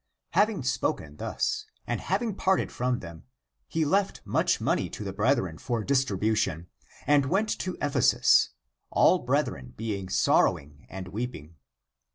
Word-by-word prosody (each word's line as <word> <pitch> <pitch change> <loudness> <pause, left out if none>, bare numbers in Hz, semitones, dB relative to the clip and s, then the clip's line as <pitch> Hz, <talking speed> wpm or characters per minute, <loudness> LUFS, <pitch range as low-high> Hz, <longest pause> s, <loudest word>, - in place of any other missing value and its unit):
Having 205 -8 +2
spoken 75 - -2
thus, - - -2 0.2
and - - -2
having 205 +4 -1
parted 190 0 +1
from 125 0 -1
them, 85 -1 -10 0.4
he 160 -1 0
left 195 +6 +1
much - - +1
money - - 0
to - - -7
the 95 -2 -5
brethren 100 - +1
for 120 -3 -2
distribution, 105 - 0 0.4
and 145 -1 +4
went 200 +8 +1
to 185 -1 -4
Ephesus, 145 -1 +4 0.4
all - - +4
brethren 65 -2 -2
be 110 -1 -2
ing 95 -2 -7
sorrowing 70 -5 +1
and 95 -1 -7
weeping. 100 -8 -6
115 Hz, 140 wpm, -27 LUFS, 90-145 Hz, 0.4 s, and